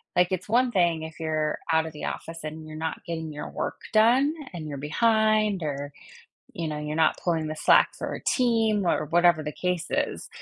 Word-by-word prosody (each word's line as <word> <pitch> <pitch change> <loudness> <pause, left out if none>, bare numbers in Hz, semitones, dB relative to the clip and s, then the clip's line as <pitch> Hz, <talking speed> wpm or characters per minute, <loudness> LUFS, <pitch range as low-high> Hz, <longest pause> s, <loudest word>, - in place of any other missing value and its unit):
Like, 180 +1 +3
it's 185 +2 -3
one 245 +2 +3
thing 170 -5 +2
if 160 +1 -9
you're 155 -1 -1
out 160 0 +3
of 160 - -6
the 150 - -6
office 165 -1 -6
and 155 +1 -7
you're 155 0 -9
not 160 0 -4
getting 160 -2 -4
your 150 - -6
work - - -4
done 250 +7 +4 0.2
and 160 -3 -6
you're 145 - -5
behind 215 - +2
or, 145 -1 -4 0.6
you 165 -2 -3
know, 150 - -4
you're 150 +1 -4
not 160 -1 +3
pulling 165 -3 0
the 155 - -4
slack - - +4
for - - -5
a - - -7
team 225 -6 +2
or 155 - +1
whatever 170 0 +4
the 150 - -4
case 180 0 -2
is. - - -2
165 Hz, 205 wpm, -26 LUFS, 155-205 Hz, 0.6 s, done